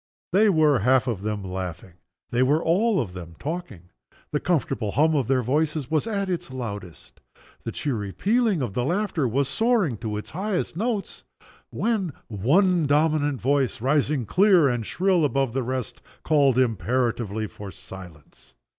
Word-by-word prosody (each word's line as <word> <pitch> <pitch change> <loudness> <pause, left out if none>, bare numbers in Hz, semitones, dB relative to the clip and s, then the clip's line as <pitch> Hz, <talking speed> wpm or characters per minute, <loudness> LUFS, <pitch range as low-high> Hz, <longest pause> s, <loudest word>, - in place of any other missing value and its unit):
They 210 +3 +5
were 155 - +4
half 125 +3 +3
of 115 -7 -2
them 105 -1 -3
laughing, 90 -2 -6 0.4
they 120 - +1
were 145 +5 +3
all 200 +5 +2
of 105 -10 -3
them 85 -2 -9
talking 130 - -6 0.4
the 150 - 0
comfortable 135 - -1
hum 155 +3 +3
of 135 -6 +1
their 130 -1 +2
voices 150 +2 -1
was 160 +7 +1
at 200 -3 -1
its 175 -3 -3
loudest; 100 -9 -8 0.4
the - - -3
cheery 110 -9 -3
pealing 215 - +1
of 110 -6 -4
the 125 - -1
laughter 175 -2 0
was 135 +4 0
soaring 220 - +1
to 105 -1 -4
its 105 - -7
highest 190 -1 -2
notes 215 +1 -3 0.5
when 210 - -1 0.2
one 160 - +2
dominant 145 -2 +2
voice, 135 -1 +1
rising 135 +1 +1
clear 185 - +4
and 120 -4 -1
shrill 185 -2 +2
above 135 -2 +1
all - - -13
the 135 - 0
rest, 130 -1 -4 0.2
called 140 -5 +3
imperatively 115 -2 0
for 105 -1 -9
silence. 90 -5 -12
135 Hz, 160 wpm, -24 LUFS, 110-170 Hz, 0.5 s, They